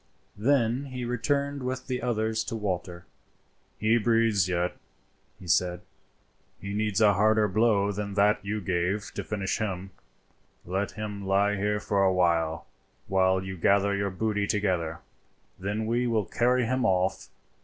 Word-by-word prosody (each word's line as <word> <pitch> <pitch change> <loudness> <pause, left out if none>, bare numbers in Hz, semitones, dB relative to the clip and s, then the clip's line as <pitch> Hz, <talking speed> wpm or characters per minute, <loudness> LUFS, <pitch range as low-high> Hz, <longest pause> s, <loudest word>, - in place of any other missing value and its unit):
Then 125 +1 +2
he 130 -2 -5
returned 140 +3 -1
with 130 0 -3
the 125 -2 -3
others 110 -2 0
to - - -4
Walter. 90 -4 -4 0.7
"He 110 +2 +3
breathes 115 -4 +2
yet," 90 0 -1 0.6
he 95 - -12
said. 90 +1 +1 0.8
"He 100 0 -6
needs 105 0 0
a 105 -2 +6
harder 110 +2 +3
blow 105 0 +2
than 100 0 -4
that 105 0 +3
you 105 +1 -3
gave 90 +1 0
him - - -9
to - - -4
finish 100 -2 -2
him. 95 -3 -3 0.7
Let 95 +3 -2
him 105 -2 -6
lie 100 +1 +2
here 105 +1 0
for 100 -1 +1
a 95 - +4
while, 85 -3 +1 0.4
while 95 -1 +2
you 95 0 -5
gather 100 +3 +3
your 100 0 -1
booty 105 +1 -1
together; 90 -6 -1 0.6
then 105 +3 -2
we 120 +2 0
will 110 -4 +1
carry 125 +3 +1
him 130 +2 0
off. 95 -2 +1
105 Hz, 155 wpm, -27 LUFS, 95-110 Hz, 0.8 s, a